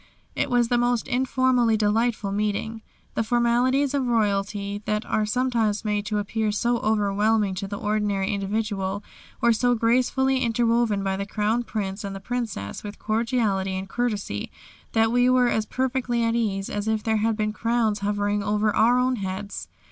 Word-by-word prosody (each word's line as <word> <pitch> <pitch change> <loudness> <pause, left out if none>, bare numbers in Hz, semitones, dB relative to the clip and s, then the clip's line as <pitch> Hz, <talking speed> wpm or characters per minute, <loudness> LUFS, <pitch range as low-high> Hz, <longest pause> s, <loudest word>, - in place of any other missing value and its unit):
It 285 - 0
was 240 -2 +2
the 245 -1 +2
most 240 0 +1
informally 255 -3 +2
delightful 215 0 +1
meeting. 210 +2 -2 0.3
The - - 0
formalities 245 +4 +2
of 270 -3 0
royalty 205 -2 0
that 210 +1 -1
are 215 -1 0
sometimes 230 -3 0
made 210 0 -1
to 215 - -1
appear 215 +1 -1
so 235 +3 0
overwhelming 210 -1 +1
to 195 - -3
the 200 +1 -5
ordinary 205 -2 0
individual, 200 -1 -2 0.4
were 235 -1 +5
so 245 +2 +2
gracefully 255 +3 +2
interwoven 230 -3 +1
by 190 0 -1
the 200 0 -4
Crown 215 +3 0
Prince 205 -3 -4
and 200 -1 -5
the - - -6
Princess 215 - -4
with 205 0 -7
cordiality 215 -4 0
and 190 +1 -4
courtesy, 210 - -2 0.4
that 225 0 +3
we 245 +1 +4
were 250 -1 +4
as 220 -2 0
perfectly 255 -2 -1
at 230 0 +1
ease, 200 -4 -1
as 205 +1 -3
if 220 -1 0
there 220 -1 +1
had 220 0 0
been 215 -1 -1
crowns 230 -1 0
hovering 205 0 0
over 210 +1 +1
our 240 +3 +4
own 250 0 +1
heads. 195 0 -5
220 Hz, 170 wpm, -24 LUFS, 205-240 Hz, 0.4 s, were